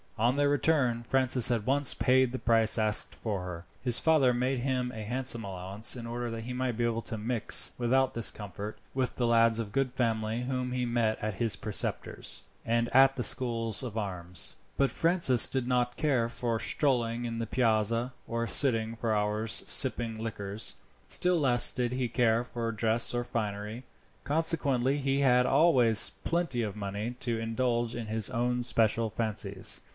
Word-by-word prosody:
On 120 Hz, +4 st, +1 dB
their 145 Hz, 0 st, +1 dB
return 140 Hz, -5 st, +1 dB
Francis 130 Hz, 0 st, +3 dB
at 115 Hz, -4 st, -1 dB
once 140 Hz, +1 st, +3 dB
paid 130 Hz, -1 st, +2 dB
the 130 Hz, -, -5 dB
price 115 Hz, -1 st, +3 dB
asked 110 Hz, -1 st, +1 dB
for 105 Hz, -5 st, -4 dB
her. 90 Hz, -1 st, -8 dB, 0.2 s
His 125 Hz, -2 st, +5 dB
father 150 Hz, -6 st, +2 dB
made 130 Hz, +1 st, -1 dB
him 125 Hz, -1 st, -2 dB
a 110 Hz, -3 st, -8 dB
handsome 120 Hz, +1 st, -3 dB
allowance, 95 Hz, +4 st, -1 dB
in 120 Hz, -2 st, -8 dB
order 120 Hz, +1 st, -5 dB
that 115 Hz, 0 st, -6 dB
he 125 Hz, +2 st, -6 dB
might 125 Hz, -1 st, -2 dB
be 120 Hz, -, -1 dB
able 115 Hz, -1 st, -1 dB
to 110 Hz, -, -6 dB
mix, 115 Hz, +1 st, +3 dB
without 130 Hz, +2 st, +1 dB
discomfort, 105 Hz, -2 st, -3 dB, 0.2 s
with 130 Hz, -1 st, -2 dB
the 120 Hz, -, -1 dB
lads 115 Hz, -1 st, +3 dB
of 110 Hz, -3 st, -4 dB
good 130 Hz, +2 st, -1 dB
family 115 Hz, -1 st, -2 dB
whom 125 Hz, 0 st, -3 dB
he 125 Hz, -1 st, -2 dB
met 115 Hz, -2 st, -1 dB
at 110 Hz, -2 st, -3 dB
his 115 Hz, -1 st, +3 dB
preceptor's 95 Hz, -, -3 dB, 0.2 s
and 115 Hz, +1 st, 0 dB
at 135 Hz, 0 st, +5 dB
the 125 Hz, -, -3 dB
schools 115 Hz, -4 st, +1 dB
of 120 Hz, -4 st, -6 dB
arms. 90 Hz, -4 st, -4 dB, 0.2 s
But 140 Hz, -1 st, +1 dB
Francis 165 Hz, -8 st, +3 dB
did 130 Hz, -2 st, -2 dB
not 125 Hz, -1 st, -1 dB
care 130 Hz, -6 st, 0 dB
for 115 Hz, -1 st, -3 dB
strolling 120 Hz, -3 st, 0 dB
in 115 Hz, -1 st, -5 dB
the 115 Hz, -, -4 dB
Piazza, 115 Hz, +1 st, 0 dB
or 115 Hz, 0 st, -3 dB
sitting 115 Hz, -3 st, +1 dB
for 115 Hz, -1 st, -2 dB
hours 105 Hz, +1 st, -1 dB
sipping 120 Hz, -4 st, +3 dB
liquors. 105 Hz, -2 st, -5 dB, 0.3 s
Still 180 Hz, 0 st, +1 dB
less 125 Hz, -6 st, +6 dB
did 125 Hz, -1 st, -2 dB
he 125 Hz, -1 st, -2 dB
care 115 Hz, -1 st, +1 dB
for 115 Hz, -1 st, -5 dB
dress 115 Hz, +2 st, -1 dB
or 120 Hz, -, -1 dB
finery. 110 Hz, 0 st, -5 dB, 0.4 s
Consequently 140 Hz, -4 st, 0 dB
he 135 Hz, 0 st, -1 dB
had 125 Hz, -2 st, +3 dB
always 130 Hz, -8 st, +6 dB
plenty 170 Hz, -8 st, -2 dB
of 105 Hz, -3 st, -4 dB
money 105 Hz, +3 st, -5 dB
to 115 Hz, -2 st, 0 dB
indulge 115 Hz, +1 st, -2 dB
in 120 Hz, -1 st, -5 dB
his 110 Hz, 0 st, 0 dB
own 125 Hz, 0 st, -1 dB
special 115 Hz, -1 st, 0 dB
fancies. 105 Hz, -3 st, -2 dB
120 Hz, 175 wpm, -28 LUFS, 110-130 Hz, 0.4 s, less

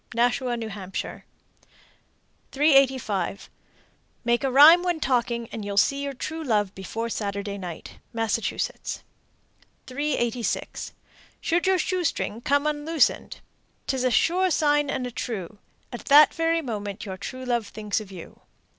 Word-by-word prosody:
Nashua, 245 Hz, +1 st, +1 dB
N.H. 205 Hz, -5 st, -4 dB, 1.5 s
385. 265 Hz, -, +2 dB, 0.7 s
Make 240 Hz, +2 st, +2 dB
a 270 Hz, -, +1 dB
rhyme 300 Hz, +7 st, +8 dB
when 355 Hz, -2 st, -1 dB
talking, 235 Hz, -4 st, 0 dB
and 220 Hz, -, -5 dB
you'll 200 Hz, 0 st, -4 dB
see 275 Hz, +7 st, +3 dB
your 280 Hz, -1 st, -4 dB
true 320 Hz, +5 st, -5 dB
love 210 Hz, -7 st, +1 dB
before 225 Hz, +5 st, -4 dB
Saturday 200 Hz, -2 st, -4 dB
night. 175 Hz, -4 st, -8 dB
Massachusetts. 225 Hz, -, -2 dB, 0.8 s
386. 255 Hz, -4 st, -2 dB, 0.5 s
Should 345 Hz, +3 st, 0 dB
your 380 Hz, -1 st, +4 dB
shoestring 335 Hz, -, -1 dB
come 285 Hz, +3 st, +1 dB
unloosened, 300 Hz, -1 st, 0 dB, 0.4 s
'T 270 Hz, -, -1 dB
is 255 Hz, -, -1 dB
a 255 Hz, -, +3 dB
sure 350 Hz, +11 st, +2 dB
sign 295 Hz, -3 st, +2 dB
and 265 Hz, -2 st, -2 dB
a 250 Hz, -, -5 dB
true, 210 Hz, -5 st, -5 dB, 0.3 s
At 240 Hz, -, -7 dB
that 290 Hz, +2 st, +7 dB
very 330 Hz, 0 st, +1 dB
moment 205 Hz, -4 st, -5 dB
Your 190 Hz, -2 st, -6 dB
true 255 Hz, +6 st, -7 dB
love 240 Hz, -4 st, 0 dB
thinks 210 Hz, 0 st, -3 dB
of 200 Hz, -2 st, -11 dB
you. 180 Hz, -3 st, -11 dB
245 Hz, 135 wpm, -25 LUFS, 210-295 Hz, 1.5 s, rhyme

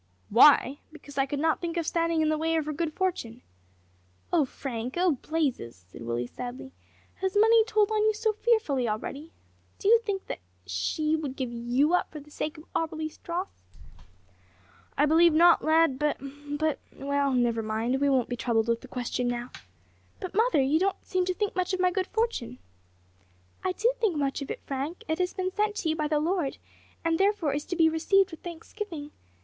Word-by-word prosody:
"Why! 270 Hz, +3 st, +6 dB
because 285 Hz, -3 st, -8 dB
I 270 Hz, -, +2 dB
could 285 Hz, -, -3 dB
not 320 Hz, +2 st, +1 dB
think 340 Hz, 0 st, -3 dB
of 335 Hz, -, 0 dB
standing 335 Hz, 0 st, +1 dB
in 310 Hz, -, +2 dB
the 310 Hz, -, +1 dB
way 325 Hz, +1 st, +1 dB
of 315 Hz, -2 st, 0 dB
her 305 Hz, -, -3 dB
good 320 Hz, +1 st, -2 dB
fortune." 275 Hz, -10 st, -3 dB, 0.9 s
"Oh, 320 Hz, -5 st, +4 dB
Frank! 250 Hz, -2 st, -5 dB
oh, 360 Hz, 0 st, +3 dB
Blazes," 280 Hz, -, -2 dB
said 95 Hz, -, -12 dB
Willie 120 Hz, +1 st, -2 dB
sadly, 250 Hz, -, -7 dB, 0.5 s
"has 380 Hz, +1 st, -1 dB
money 450 Hz, +1 st, +6 dB
told 430 Hz, -1 st, +2 dB
on 430 Hz, -1 st, +2 dB
you 435 Hz, -, +4 dB
so 440 Hz, 0 st, 0 dB
fearfully 410 Hz, -, +1 dB
already? 275 Hz, +9 st, -5 dB, 0.5 s
Do -, -, -3 dB
you 460 Hz, +1 st, +7 dB
think 405 Hz, -4 st, -3 dB
that -, -, -5 dB, 0.3 s
she 95 Hz, -, 0 dB
would 290 Hz, -4 st, -4 dB
give 255 Hz, -3 st, -3 dB
you 240 Hz, +7 st, +1 dB
up 360 Hz, -, +1 dB
for 305 Hz, -, -7 dB
the 300 Hz, +1 st, -16 dB
sake 305 Hz, +2 st, -4 dB
of 305 Hz, -, -11 dB
Auberly's 315 Hz, -1 st, -3 dB
dross?" 355 Hz, +3 st, -3 dB, 1.5 s
"I 290 Hz, -, +4 dB
believe 325 Hz, +1 st, +5 dB
not, 340 Hz, +2 st, +6 dB
lad; 315 Hz, -4 st, +3 dB
but 300 Hz, -1 st, +1 dB, 0.4 s
but 310 Hz, -1 st, 0 dB, 0.2 s
well 280 Hz, 0 st, 0 dB
never 240 Hz, -3 st, +1 dB
mind, 225 Hz, +5 st, -1 dB
we 285 Hz, -, +3 dB
won't 260 Hz, -3 st, +2 dB
be 245 Hz, -, -3 dB
troubled 235 Hz, -2 st, 0 dB
with 230 Hz, 0 st, +1 dB
the 260 Hz, -, -11 dB
question 250 Hz, 0 st, -2 dB
now. 245 Hz, 0 st, -3 dB, 0.7 s
But, 370 Hz, -, -6 dB
mother, 445 Hz, -, +3 dB
you 290 Hz, +4 st, +2 dB
don't 390 Hz, +1 st, -1 dB
seem 370 Hz, -1 st, 0 dB
to 370 Hz, -, 0 dB
think 415 Hz, +1 st, -2 dB
much 370 Hz, +1 st, 0 dB
of -, -, -6 dB
my 365 Hz, 0 st, +3 dB
good 370 Hz, 0 st, -1 dB
fortune." 445 Hz, -, -2 dB, 1.1 s
"I 370 Hz, -, +1 dB
do 465 Hz, +6 st, +2 dB
think 430 Hz, -7 st, +1 dB
much 280 Hz, -1 st, -1 dB
of 280 Hz, -, -6 dB
it, -, -, -5 dB
Frank; 280 Hz, +5 st, -4 dB
it 320 Hz, +1 st, -1 dB
has 360 Hz, 0 st, 0 dB
been 370 Hz, 0 st, -2 dB
sent 420 Hz, +1 st, 0 dB
to 325 Hz, -, -1 dB
you 315 Hz, -, +1 dB
by 305 Hz, -2 st, -1 dB
the 300 Hz, 0 st, +1 dB
Lord, 330 Hz, -3 st, -1 dB, 0.5 s
and 330 Hz, 0 st, +1 dB
therefore 390 Hz, -7 st, +2 dB
is 290 Hz, +1 st, -3 dB
to 355 Hz, -, -3 dB
be 325 Hz, -2 st, +5 dB
received 365 Hz, +4 st, +3 dB
with 325 Hz, -, -10 dB
thanksgiving. 335 Hz, -2 st, -7 dB
315 Hz, 200 wpm, -27 LUFS, 270-365 Hz, 1.5 s, you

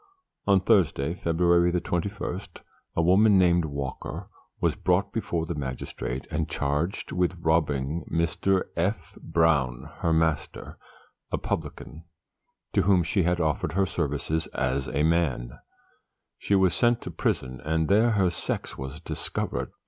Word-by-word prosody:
On 100 Hz, -1 st, +5 dB
Thursday, 90 Hz, -7 st, +2 dB
February 85 Hz, 0 st, +2 dB
21, 90 Hz, +2 st, -3 dB, 0.5 s
a -, -, +2 dB
woman 100 Hz, +4 st, +5 dB
named 90 Hz, -2 st, +4 dB
Walker 70 Hz, -3 st, -5 dB, 0.3 s
was -, -, +2 dB
brought 90 Hz, +2 st, +1 dB
before 85 Hz, -7 st, -1 dB
the 85 Hz, -, -3 dB
magistrate 65 Hz, -2 st, -5 dB
and -, -, -1 dB
charged 75 Hz, +7 st, -2 dB
with 90 Hz, 0 st, 0 dB
robbing 80 Hz, -2 st, 0 dB
Mr. 85 Hz, +3 st, +1 dB
F. 90 Hz, +6 st, -2 dB
Brown, 75 Hz, -7 st, +1 dB
her 85 Hz, -, +1 dB
master, 80 Hz, -2 st, -1 dB, 0.5 s
a -, -, +1 dB
publican, 80 Hz, +2 st, -5 dB, 0.7 s
to -, -, +4 dB
whom 90 Hz, -1 st, +4 dB
she 95 Hz, +4 st, +1 dB
had 90 Hz, 0 st, +1 dB
offered 75 Hz, -1 st, 0 dB
her 95 Hz, +2 st, +2 dB
services 80 Hz, -1 st, -2 dB
as 65 Hz, +1 st, 0 dB
a 75 Hz, +1 st, 0 dB
man. 75 Hz, -8 st, 0 dB, 0.8 s
She 100 Hz, -, +1 dB
was 95 Hz, -3 st, +4 dB
sent 120 Hz, -1 st, +2 dB
to -, -, -6 dB
prison, 65 Hz, 0 st, -2 dB
and 80 Hz, +1 st, 0 dB
there 110 Hz, +6 st, +4 dB
her 95 Hz, -4 st, +2 dB
sex 80 Hz, -, -4 dB
was 65 Hz, +4 st, -6 dB
discovered. 65 Hz, -5 st, -3 dB
85 Hz, 135 wpm, -26 LUFS, 75-90 Hz, 0.8 s, On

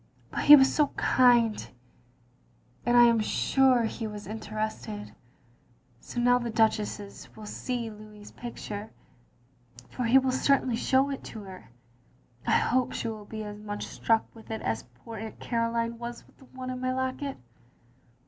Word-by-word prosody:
But -, -, -2 dB
he 295 Hz, -, +12 dB
was 270 Hz, -2 st, +5 dB
so 300 Hz, -2 st, +3 dB
kind, 240 Hz, -3 st, +3 dB, 1.2 s
and 240 Hz, 0 st, +4 dB
I 240 Hz, -, +9 dB
am 235 Hz, -1 st, +5 dB
sure 255 Hz, +3 st, +3 dB
he 225 Hz, 0 st, -3 dB
was 210 Hz, -1 st, -8 dB
interested. 215 Hz, 0 st, -5 dB, 0.9 s
So 245 Hz, -, -6 dB
now 245 Hz, +1 st, +4 dB
the 240 Hz, -1 st, -3 dB
Duchess 215 Hz, -2 st, -1 dB
will 215 Hz, -, -10 dB
see 235 Hz, +1 st, -4 dB
Louis's 210 Hz, -1 st, -13 dB
photo, 215 Hz, -3 st, -7 dB, 1.0 s
for 250 Hz, -, -3 dB
he 235 Hz, +3 st, +6 dB
will 265 Hz, -1 st, +3 dB
certainly 265 Hz, -2 st, +2 dB
show 265 Hz, +4 st, +2 dB
it 275 Hz, -, -5 dB
to 220 Hz, -, -8 dB
her. 190 Hz, -, -11 dB, 0.8 s
I -, -, +5 dB
hope 255 Hz, +1 st, +1 dB
she 230 Hz, -, -3 dB
will 215 Hz, -2 st, -7 dB
be 215 Hz, +1 st, -6 dB
as 210 Hz, 0 st, -7 dB
much 205 Hz, 0 st, -5 dB
struck 225 Hz, -1 st, +1 dB
with 225 Hz, -1 st, -15 dB
it 220 Hz, -1 st, -4 dB
as 110 Hz, 0 st, -2 dB, 0.2 s
poor 230 Hz, -1 st, -7 dB
Aunt 220 Hz, +1 st, -7 dB
Caroline 230 Hz, 0 st, -1 dB
was 235 Hz, 0 st, -7 dB
with -, -, -25 dB
the 265 Hz, -, -16 dB
one 255 Hz, 0 st, -7 dB
in 255 Hz, 0 st, -5 dB
my 255 Hz, 0 st, 0 dB
locket. 260 Hz, +2 st, -3 dB
230 Hz, 160 wpm, -28 LUFS, 215-255 Hz, 1.2 s, he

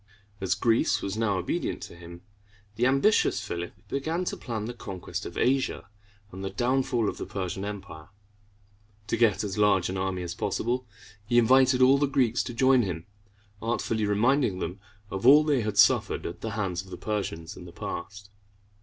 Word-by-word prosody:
As 95 Hz, -1 st, +1 dB
Greece 115 Hz, +2 st, +2 dB
was 100 Hz, 0 st, -3 dB
now 110 Hz, -3 st, 0 dB
obedient 90 Hz, -, -2 dB
to -, -, -9 dB
him, 85 Hz, 0 st, -11 dB, 0.5 s
the 120 Hz, +3 st, +2 dB
ambitious 135 Hz, +11 st, +3 dB
Philip 85 Hz, 0 st, -5 dB
began 160 Hz, +6 st, -2 dB
to -, -, -2 dB
plan 110 Hz, -4 st, -5 dB
the 120 Hz, -, -5 dB
conquest 95 Hz, -6 st, -6 dB
of -, -, -9 dB
Asia 130 Hz, -5 st, 0 dB, 0.4 s
and 95 Hz, +1 st, -8 dB
the 95 Hz, -, -2 dB
downfall 125 Hz, -2 st, 0 dB
of -, -, -3 dB
the -, -, -4 dB
Persian 95 Hz, 0 st, -4 dB
Empire. 100 Hz, -6 st, -7 dB, 1.0 s
To 115 Hz, -, -1 dB
get 115 Hz, -4 st, +2 dB
as 100 Hz, 0 st, -4 dB
large 100 Hz, -4 st, +3 dB
an 95 Hz, -, -3 dB
army 95 Hz, -1 st, -2 dB
as 85 Hz, 0 st, -4 dB
possible, 125 Hz, +5 st, -2 dB, 0.4 s
he 120 Hz, +3 st, +1 dB
invited 130 Hz, +2 st, +5 dB
all 135 Hz, +2 st, +6 dB
the 145 Hz, -, +2 dB
Greeks 125 Hz, -3 st, +2 dB
to 120 Hz, -, -5 dB
join 130 Hz, +1 st, +5 dB
him, 90 Hz, -6 st, -4 dB, 0.6 s
artfully 115 Hz, -2 st, -1 dB
reminding 110 Hz, +1 st, +2 dB
them 90 Hz, +2 st, -4 dB, 0.3 s
of 95 Hz, +5 st, -1 dB
all 150 Hz, +3 st, +8 dB
they 145 Hz, -5 st, +2 dB
had 105 Hz, -2 st, -3 dB
suffered -, -, +4 dB
at 85 Hz, -, -6 dB
the 110 Hz, -, -3 dB
hands 95 Hz, -4 st, -1 dB
of 95 Hz, -, -16 dB
the -, -, -7 dB
Persians 100 Hz, -4 st, -4 dB
in 90 Hz, -, -11 dB
the 85 Hz, -, -10 dB
past. 100 Hz, +3 st, -7 dB
105 Hz, 180 wpm, -27 LUFS, 95-125 Hz, 1.0 s, all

